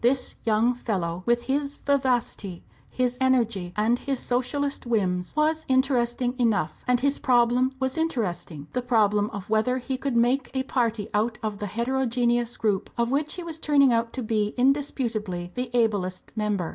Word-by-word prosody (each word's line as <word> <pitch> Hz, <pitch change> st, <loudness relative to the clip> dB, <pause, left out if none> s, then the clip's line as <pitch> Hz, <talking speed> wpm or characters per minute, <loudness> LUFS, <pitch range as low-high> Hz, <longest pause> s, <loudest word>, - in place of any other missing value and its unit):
This 255 Hz, +1 st, +2 dB
young 225 Hz, +2 st, +3 dB
fellow, 185 Hz, -8 st, -3 dB
with 240 Hz, 0 st, +2 dB
his 280 Hz, +1 st, -1 dB
vivacity, 250 Hz, -9 st, -1 dB, 0.3 s
his 250 Hz, -1 st, -1 dB
energy, 230 Hz, -9 st, +1 dB
and 225 Hz, +3 st, +2 dB
his 275 Hz, -2 st, -2 dB
Socialist 260 Hz, +2 st, -1 dB
whims, 185 Hz, -5 st, 0 dB
was 310 Hz, +1 st, +2 dB
interesting 250 Hz, -2 st, +1 dB
enough; 215 Hz, -9 st, 0 dB
and 250 Hz, -1 st, +3 dB
his 280 Hz, +2 st, +1 dB
problem 245 Hz, +1 st, +3 dB
was 260 Hz, +3 st, -1 dB
interesting 185 Hz, -, -2 dB
the 250 Hz, -, 0 dB
problem 210 Hz, -4 st, +2 dB
of 200 Hz, -1 st, -7 dB
whether 220 Hz, +4 st, +1 dB
he 260 Hz, +1 st, -3 dB
could 270 Hz, -1 st, -2 dB
make 245 Hz, +3 st, +2 dB
a 260 Hz, -, +1 dB
party 230 Hz, -5 st, -1 dB
out 215 Hz, +2 st, +1 dB
of 210 Hz, -2 st, -3 dB
the 210 Hz, -, -3 dB
heterogeneous 240 Hz, +1 st, 0 dB
group 205 Hz, -4 st, 0 dB
of 235 Hz, +1 st, +1 dB
which 290 Hz, +2 st, 0 dB
he 360 Hz, -, -6 dB
was 325 Hz, -2 st, -5 dB
turning 280 Hz, -5 st, +4 dB
out 230 Hz, 0 st, 0 dB
to 255 Hz, -, -4 dB
be 215 Hz, -1 st, 0 dB
indisputably 235 Hz, -9 st, 0 dB
the 250 Hz, 0 st, -3 dB
ablest 205 Hz, -7 st, 0 dB
member. 210 Hz, -5 st, -1 dB
240 Hz, 165 wpm, -25 LUFS, 215-260 Hz, 0.3 s, turning